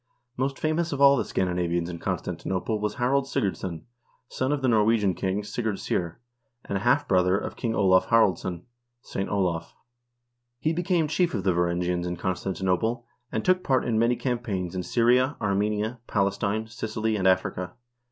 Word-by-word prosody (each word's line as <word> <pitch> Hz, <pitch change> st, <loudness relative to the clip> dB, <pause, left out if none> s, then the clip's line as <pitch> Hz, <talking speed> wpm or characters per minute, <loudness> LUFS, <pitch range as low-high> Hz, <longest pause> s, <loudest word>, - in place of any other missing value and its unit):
Most 135 Hz, +2 st, -1 dB
famous 160 Hz, +2 st, 0 dB
of 140 Hz, -, -3 dB
all 140 Hz, 0 st, +7 dB
the -, -, 0 dB
Scandinavians 90 Hz, -2 st, -1 dB
in 85 Hz, -1 st, -6 dB
Constanti -, -, -4 dB
nople 100 Hz, +3 st, -1 dB
was 105 Hz, 0 st, -2 dB
Ilarald 135 Hz, +3 st, +1 dB
Sigurdsson, 95 Hz, -8 st, -2 dB, 0.5 s
son 130 Hz, +2 st, -1 dB
of 145 Hz, -2 st, -1 dB
the -, -, +3 dB
Norwegian 110 Hz, -3 st, +3 dB
king, 95 Hz, +4 st, -2 dB
Sigurd 110 Hz, -1 st, -2 dB
Syr, 85 Hz, -3 st, -2 dB, 0.5 s
and 100 Hz, -, -3 dB
a 95 Hz, -, -1 dB
half 135 Hz, +6 st, +2 dB
brother 90 Hz, 0 st, +3 dB
of -, -, -5 dB
King 115 Hz, -2 st, -2 dB
Olav 95 Hz, -2 st, +4 dB
Haraldsson 95 Hz, -6 st, +2 dB, 0.4 s
(St. 95 Hz, -, -4 dB
Olav). 90 Hz, -5 st, -1 dB, 0.8 s
He 155 Hz, +6 st, 0 dB
became 175 Hz, -1 st, +1 dB
chief 175 Hz, +3 st, +1 dB
of 95 Hz, -, -2 dB
the 95 Hz, -1 st, +2 dB
Varangians 90 Hz, 0 st, 0 dB
in 90 Hz, -, -2 dB
Constantinople, 95 Hz, +6 st, -1 dB, 0.3 s
and -, -, -2 dB
took 185 Hz, 0 st, +3 dB
part 130 Hz, -1 st, +2 dB
in 115 Hz, -2 st, +1 dB
many 120 Hz, +2 st, +3 dB
campaigns 115 Hz, -9 st, -2 dB
in 90 Hz, -, -2 dB
Syria, 125 Hz, +8 st, +2 dB
Armenia, 105 Hz, +3 st, -1 dB
Palestine, 100 Hz, +2 st, 0 dB
Sicily, 110 Hz, 0 st, -2 dB
and 95 Hz, -2 st, +1 dB
Africa. 90 Hz, -1 st, +1 dB
105 Hz, 165 wpm, -26 LUFS, 95-125 Hz, 0.8 s, all